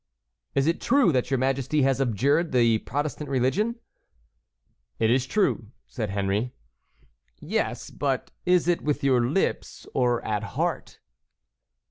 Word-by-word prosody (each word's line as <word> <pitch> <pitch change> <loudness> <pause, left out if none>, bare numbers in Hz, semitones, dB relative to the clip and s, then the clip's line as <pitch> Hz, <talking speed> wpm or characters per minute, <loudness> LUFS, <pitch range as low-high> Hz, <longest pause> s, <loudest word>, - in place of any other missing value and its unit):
"Is 135 0 +2
it 165 +2 0
true 270 -8 +4
that 125 -3 0
your 135 - +1
majesty 135 +3 +1
has 135 0 +2
abjured 140 - +1
the 115 -3 +4
Protestant 145 +3 -4
religion?" 140 - +1 1.2
"It 110 0 +2
is 130 +1 +2
true," 190 - +1 0.2
said 110 -5 -4
Henry. 100 +4 -1 0.8
"Yes, - - -2
but - - -2
is 180 -2 +3
it 175 0 +2
with 150 -1 -1
your 130 -3 +3
lips 145 +11 -1
or 120 -2 +1
at 105 -2 -1 0.2
heart?" - - -2
135 Hz, 130 wpm, -26 LUFS, 120-155 Hz, 1.2 s, true